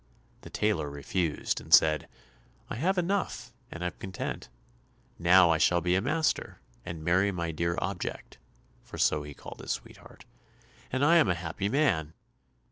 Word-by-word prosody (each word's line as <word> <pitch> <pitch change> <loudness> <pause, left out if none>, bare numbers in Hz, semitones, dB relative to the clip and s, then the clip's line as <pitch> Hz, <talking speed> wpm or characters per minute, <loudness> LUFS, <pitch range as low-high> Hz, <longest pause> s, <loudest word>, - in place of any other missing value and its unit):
The - - -11
tailor 100 -9 0
refused, 75 +3 -2
and - - -14
said, 75 -1 +5 0.6
"I - - -2
have 185 +9 +1
enough 185 +2 -2 0.2
and 85 - -6
am 90 - -1
content; 95 -9 -5 0.7
now 85 0 +6
I 80 - +2
shall 85 +1 +4
be 90 +1 0
a 95 - +2
master, 155 +7 -1 0.2
and 80 -2 -7
marry 90 +5 +3
my 85 -3 -3
dear 85 +2 -1
object 90 0 -5 0.4
(for - - -10
so 75 - +2
he 75 -1 -9
called - - -11
his - - -2
sweetheart), - - -11 0.7
and 130 +2 +1
I 170 +3 +6
am 160 - +4
a 90 - +2
happy 85 +4 -3
man." 95 - +1
90 Hz, 160 wpm, -29 LUFS, 80-105 Hz, 0.7 s, now